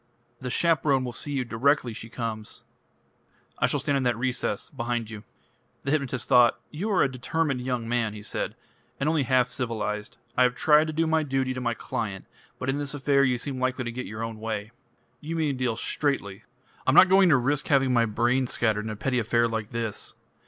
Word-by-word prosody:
"The 130 Hz, -, -5 dB
chaperone 140 Hz, -2 st, +2 dB
will 120 Hz, -, -5 dB
see 145 Hz, -, -4 dB
you 130 Hz, -2 st, -1 dB
directly 125 Hz, +1 st, +1 dB
she 115 Hz, +1 st, -9 dB
comes 115 Hz, -2 st, -5 dB, 0.5 s
" -, -, -32 dB
"I -, -, +3 dB
shall -, -, 0 dB
stand 140 Hz, -, 0 dB
in -, -, -1 dB
that 120 Hz, -2 st, +1 dB
recess. 125 Hz, -4 st, -2 dB
Behind 120 Hz, -1 st, -3 dB
you." 105 Hz, -1 st, -8 dB, 0.6 s
The 135 Hz, -, -1 dB
hypnotist 135 Hz, -5 st, -1 dB
thought. 120 Hz, -1 st, +5 dB
"You 180 Hz, +8 st, -3 dB
are 200 Hz, -, +3 dB
a -, -, +3 dB
determined 135 Hz, +2 st, -1 dB
young 125 Hz, -2 st, -2 dB
man," 115 Hz, -3 st, 0 dB
he 105 Hz, -, -9 dB
said, -, -, -3 dB, 0.4 s
"and 140 Hz, -, 0 dB
only 155 Hz, -1 st, +2 dB
half 130 Hz, -1 st, +2 dB
civilised. 105 Hz, -4 st, -3 dB, 0.2 s
I -, -, +2 dB
have 125 Hz, 0 st, +4 dB
tried 155 Hz, +2 st, +4 dB
to 155 Hz, -, -3 dB
do 165 Hz, +2 st, +1 dB
my 160 Hz, 0 st, +2 dB
duty 135 Hz, -3 st, -1 dB
to 130 Hz, -, -5 dB
my 120 Hz, -1 st, -1 dB
client, 110 Hz, -8 st, -4 dB, 0.3 s
but 130 Hz, -, -5 dB
in 135 Hz, +2 st, 0 dB
this 145 Hz, 0 st, -3 dB
affair 140 Hz, 0 st, +3 dB
you 125 Hz, -2 st, +2 dB
seem 130 Hz, +2 st, -4 dB
likely 130 Hz, 0 st, 0 dB
to 120 Hz, -, -4 dB
get 125 Hz, +2 st, -5 dB
your 110 Hz, +1 st, -5 dB
own 115 Hz, -1 st, -5 dB
way...." 110 Hz, -1 st, -4 dB, 0.5 s
"You 160 Hz, +4 st, -5 dB
mean 155 Hz, -3 st, +1 dB
to 130 Hz, -, -7 dB
deal 120 Hz, -3 st, +1 dB
straightly." 115 Hz, -6 st, -2 dB, 0.4 s
"I'm 130 Hz, -, +4 dB
not 190 Hz, -, +9 dB
going 190 Hz, 0 st, +6 dB
to 145 Hz, -, +6 dB
risk 135 Hz, +3 st, 0 dB
having 135 Hz, -3 st, +3 dB
my 115 Hz, -1 st, +3 dB
brains 120 Hz, +4 st, +1 dB
scattered 110 Hz, -2 st, 0 dB
in -, -, -3 dB
a 110 Hz, -, -4 dB
petty 125 Hz, +4 st, 0 dB
affair 115 Hz, +1 st, +2 dB
like 110 Hz, -2 st, -3 dB
this." 115 Hz, -3 st, -4 dB
125 Hz, 215 wpm, -26 LUFS, 115-140 Hz, 0.6 s, not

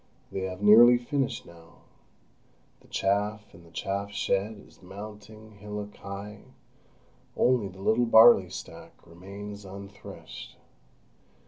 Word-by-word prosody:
They 95 Hz, -1 st, -3 dB
have 95 Hz, +1 st, -6 dB
nearly 120 Hz, +4 st, +8 dB
finished 135 Hz, +2 st, -2 dB
now; 85 Hz, 0 st, -17 dB, 1.0 s
the -, -, -23 dB
chaff 105 Hz, +2 st, -1 dB
in 85 Hz, -, -15 dB
the 85 Hz, -, -17 dB
chaff 100 Hz, +4 st, -3 dB
shed 100 Hz, +1 st, -1 dB
is -, -, -22 dB
mounting 105 Hz, +2 st, -11 dB
hillock 105 Hz, 0 st, -7 dB
high; 100 Hz, +1 st, -8 dB, 1.0 s
only 125 Hz, -5 st, +2 dB
the 95 Hz, 0 st, -12 dB
little 115 Hz, +3 st, +2 dB
barley 110 Hz, -5 st, +7 dB
stack 95 Hz, -, -9 dB
remains 100 Hz, +4 st, -10 dB
unthreshed. 100 Hz, +1 st, -11 dB
100 Hz, 115 wpm, -27 LUFS, 95-110 Hz, 1.0 s, nearly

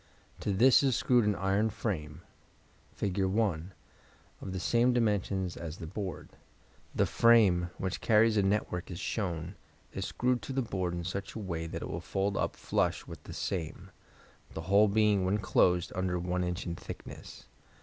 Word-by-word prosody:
To -, -, -1 dB
this 125 Hz, +7 st, +6 dB
is 135 Hz, -4 st, +2 dB
screwed 120 Hz, -3 st, +3 dB
an 105 Hz, -1 st, +2 dB
iron 100 Hz, +4 st, +1 dB
frame 85 Hz, -7 st, -4 dB, 0.7 s
(Fig. 100 Hz, -1 st, -1 dB
1) 95 Hz, -3 st, 0 dB, 0.7 s
of 95 Hz, -, -6 dB
the 95 Hz, -, -3 dB
same 120 Hz, +6 st, +3 dB
dimensions 100 Hz, -5 st, 0 dB
as 85 Hz, 0 st, -6 dB
the 85 Hz, -, -7 dB
board. 95 Hz, +2 st, -5 dB, 0.7 s
The -, -, +3 dB
frame, 105 Hz, -7 st, +4 dB
which 95 Hz, 0 st, -3 dB
carries 110 Hz, 0 st, +4 dB
a 105 Hz, -, +4 dB
network 95 Hz, -3 st, -1 dB
as 90 Hz, -2 st, -6 dB
shown, 90 Hz, -4 st, -3 dB, 0.4 s
is -, -, -3 dB
screwed 125 Hz, 0 st, 0 dB
to 135 Hz, -, -6 dB
the 135 Hz, 0 st, 0 dB
board 95 Hz, -5 st, -2 dB
in 85 Hz, -, -4 dB
such 95 Hz, +3 st, -5 dB
a -, -, -4 dB
way 85 Hz, -5 st, -4 dB
that -, -, -5 dB
it -, -, -4 dB
will -, -, -4 dB
fold 100 Hz, +1 st, -1 dB
up -, -, -1 dB
flush -, -, -1 dB
with -, -, -10 dB
the -, -, -8 dB
same, 85 Hz, -5 st, -4 dB, 0.6 s
the 80 Hz, -, -3 dB
whole 100 Hz, +5 st, +4 dB
being 105 Hz, -1 st, +3 dB
when 95 Hz, +3 st, +1 dB
closed 90 Hz, -4 st, +2 dB
under 90 Hz, -1 st, -1 dB
1 90 Hz, +1 st, -1 dB
in. 90 Hz, 0 st, -1 dB
in 85 Hz, -2 st, -3 dB
thickness. -, -, -10 dB
95 Hz, 175 wpm, -31 LUFS, 90-105 Hz, 0.7 s, this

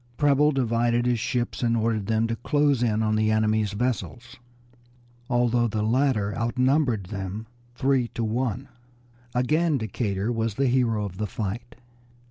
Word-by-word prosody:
Preble 145 Hz, 0 st, +4 dB
divided 120 Hz, -2 st, +1 dB
his 120 Hz, -2 st, +1 dB
ships, 125 Hz, 0 st, -2 dB
and 115 Hz, -1 st, +2 dB
ordered 110 Hz, -3 st, 0 dB
them 110 Hz, 0 st, +1 dB
to 115 Hz, 0 st, -1 dB
close 145 Hz, +1 st, +1 dB
in 110 Hz, -2 st, +1 dB
on 110 Hz, 0 st, +1 dB
the 110 Hz, 0 st, +2 dB
enemy's 110 Hz, -1 st, +1 dB
vessels, 120 Hz, +1 st, -3 dB, 0.9 s
although 120 Hz, -1 st, +2 dB
the 105 Hz, -1 st, -2 dB
latter 110 Hz, -3 st, +1 dB
outnumbered 125 Hz, 0 st, +1 dB
them 100 Hz, +2 st, -5 dB, 0.3 s
three 130 Hz, -2 st, +1 dB
to 115 Hz, -, -1 dB
one. 125 Hz, +3 st, -2 dB, 0.7 s
Again 155 Hz, +5 st, +2 dB
Decatur 110 Hz, -2 st, -2 dB
was 115 Hz, -2 st, -1 dB
the 140 Hz, -, +1 dB
hero 120 Hz, -4 st, +1 dB
of 90 Hz, -2 st, -7 dB
the 105 Hz, -, -1 dB
fight. 110 Hz, +4 st, -5 dB
115 Hz, 145 wpm, -25 LUFS, 110-125 Hz, 0.9 s, Preble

